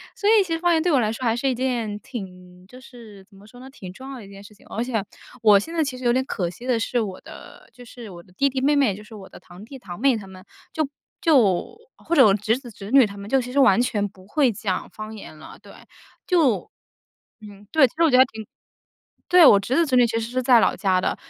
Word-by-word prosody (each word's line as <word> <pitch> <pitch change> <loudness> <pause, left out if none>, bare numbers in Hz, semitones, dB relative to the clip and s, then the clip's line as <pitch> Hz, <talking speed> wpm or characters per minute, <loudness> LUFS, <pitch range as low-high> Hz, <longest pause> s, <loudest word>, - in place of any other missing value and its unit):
所 410 - 0
以 435 -2 +5
其 335 -3 -4
实 325 - -2
方 350 0 +2
言 320 - +2
对 355 - +1
我 275 - +3
来 215 -2 0
说 240 +3 -7
还 230 -1 +1
是 245 +3 -2
一 260 - 0
件 240 -5 -2
挺 180 -6 -11
就 250 +4 -14
是 225 -7 -14
怎 195 - -23
么 205 - -17
说 245 +3 -16
呢？ 260 - -12
挺 190 -9 -11
重 265 +6 -10
要 265 - -8
的 220 - -11
一 - - -15
件 200 0 -13
事 210 - -15
情。 210 - -23
而 230 - -4
且 230 -5 -2 0.4
我 210 -3 +6
现 330 +11 -8
在 325 -2 +1
其 265 -3 -5
实 255 - -11
有 240 - +2
点 260 +2 +1
可 180 -9 -3
惜 235 +8 -12
的 250 -3 0
是， 240 +2 -1
我 195 -4 -5
的 - - -14
就 245 - -15
是 235 -2 -11
我 175 -2 -11
的 180 - -24
弟 275 +8 +1
弟 265 0 -3
妹 290 +2 +2
妹， 270 -8 +2
就 210 - -12
是 215 +1 -14
我 195 -2 -12
的 - - -14
堂 180 +3 -15
弟 265 +4 -11
堂 180 -7 -10
妹 265 -3 +2
他 195 -2 -10
们， 185 -1 -13 0.3
就 315 - 0 0.4
就 255 - +2 0.2
或 335 - -6
者 270 - +7
我 200 - +5
侄 215 +3 0
子 260 -2 -12
侄 200 +1 -10
女 265 -3 +6
他 200 -1 -9
们 200 +1 -10
就 270 +2 +2
其 250 0 -8
实 280 - +1
完 240 -4 +5
全 210 -4 -1
不 190 0 -20
会 265 +1 +1
讲 190 -2 -4
方 215 0 -9
言 155 -6 -12
了。 155 - -13
对， - - -15 0.5
就 310 - +1 0.7
嗯， 205 -1 -14
对， 305 -5 +5
其 - - -20
实 335 - +1
我 325 - +4
觉 - - -2
得 - - +5
还 260 - +7
挺 220 -4 -10 0.8
对， 355 -1 +6
我 200 - +7
侄 220 +6 -3
子 335 - +3
侄 265 - -2
女 245 -1 +5
其 230 0 -2
实 230 +1 -5
是 255 0 -2
在 245 -1 +5
老 - - +2
家 190 -3 0
的， - - -1
230 Hz, 305 characters per minute, -22 LUFS, 200-265 Hz, 0.8 s, 者